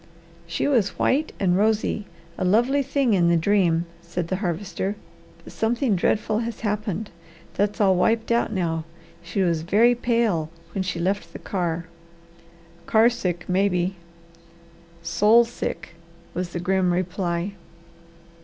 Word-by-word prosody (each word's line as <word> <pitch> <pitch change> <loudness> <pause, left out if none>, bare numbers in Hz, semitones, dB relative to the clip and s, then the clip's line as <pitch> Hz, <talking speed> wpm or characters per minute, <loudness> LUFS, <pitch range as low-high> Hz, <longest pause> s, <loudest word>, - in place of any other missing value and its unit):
"She 170 - -1
was 235 -9 +1
white 295 +4 +1
and 180 -3 +2
rosy, 210 0 +1 0.3
a - - -3
lovely 240 +9 +3
thing 275 -3 +1
in 175 -3 +3
the 170 - +4
dream," 170 -2 +2 0.2
said 170 0 -4
the 185 - 0
Harvester, 190 +1 -3 0.5
"but - - -12
something 230 0 +1
dreadful 215 +4 +1
has 235 -1 -4
happened. 210 -1 -2 0.4
That's 205 +2 0
all 195 -3 +5
wiped 225 +5 +1
out 235 -1 +2
now. 165 -5 -1 0.4
She 180 +3 -1
was 170 -3 +1
very 215 +8 +4
pale 230 -9 0 0.2
when 195 - -1
she 185 -2 -3
left 195 +4 -1
the - - -6
car." 170 -3 -2 1.0
"Car 225 +2 +5
sick, 180 -8 -3
maybe." 185 -1 +1 1.1
"Soul 210 +8 +5
sick!" 235 - -5 0.4
was 180 0 -3
the 175 - -4
grim 185 0 +1
reply. 180 +1 -1
195 Hz, 135 wpm, -24 LUFS, 175-220 Hz, 1.1 s, all